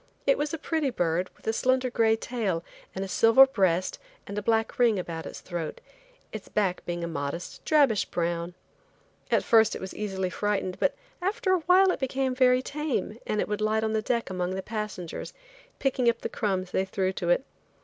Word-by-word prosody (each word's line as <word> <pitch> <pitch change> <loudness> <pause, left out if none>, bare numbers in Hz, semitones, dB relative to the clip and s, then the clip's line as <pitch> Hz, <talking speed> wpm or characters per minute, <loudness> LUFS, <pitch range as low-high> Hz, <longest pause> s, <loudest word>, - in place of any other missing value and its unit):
It - - +5
was 295 -7 -2
a 325 - -2
pretty 315 -2 -1
bird 175 -5 0
with - - -23
a 220 - +1
slender 255 +1 +1
gray 225 -2 +3
tail 220 -8 -2 0.3
and 190 +1 -2
a - - -6
silver 225 +7 +7
breast 190 -8 0 0.3
and 200 - -7
a 210 - -1
black 225 +5 0
ring 235 -4 +4
about 165 -3 -5
its - - -8
throat, 170 -3 -5 0.5
its 215 -3 -8
back 195 -4 0
being 175 0 -3
a - - -2
modest 160 +1 -5
drabish 280 -9 +4
brown. 170 0 -2 0.7
At - - +2
first 220 -2 +4
it - - -5
was 190 - -6
easily 190 -3 -3
frightened 195 -3 -1
but - - +2 0.3
after 385 +1 0
awhile 370 +2 +5
it - - -3
became 265 0 0
very 255 0 +4
tame 280 -7 -3
and 210 - +1
would 210 0 -3
light 215 +1 +1
on 220 0 0
the 220 - +1
deck 230 -2 -1
among 180 0 -2
the 190 - -4
passengers, 210 -5 -5 0.4
picking 260 -3 +2
up 235 - -1
the - - -3
crumbs 190 -4 -2
they 190 - +1
threw 190 0 -1
to - - -3
it. - - +3
215 Hz, 195 wpm, -27 LUFS, 185-255 Hz, 0.7 s, silver